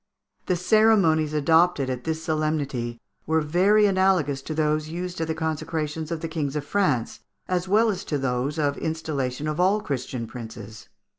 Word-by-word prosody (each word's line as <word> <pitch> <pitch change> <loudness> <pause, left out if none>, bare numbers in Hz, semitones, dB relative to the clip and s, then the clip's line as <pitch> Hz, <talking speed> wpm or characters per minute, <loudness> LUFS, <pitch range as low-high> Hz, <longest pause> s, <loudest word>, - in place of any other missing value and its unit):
The 180 - +2
ceremonies 180 -5 +3
adopted 160 0 +3
at 125 -1 -4
this 160 0 -2
solemnity 145 -7 -2 0.3
were 160 +1 +3
very 185 +8 +3
analogous 185 -8 +2
to 155 +3 -5
those 155 0 0
used 180 +1 -5
at 160 - -1
the 160 - -2
consecrations 160 -1 -3
of 165 -2 -3
the 165 - -3
kings 155 -3 -3
of 150 -1 -2
France, 150 - 0 0.3
as 180 0 -1
well 215 +3 +4
as 190 - -5
to 150 - -1
those 135 +2 -1
of 145 -2 0
installation 155 -4 -3
of 155 +2 -2
all 190 +4 +3
Christian 130 - -4
princes. 110 -2 -9
155 Hz, 165 wpm, -25 LUFS, 140-175 Hz, 0.3 s, well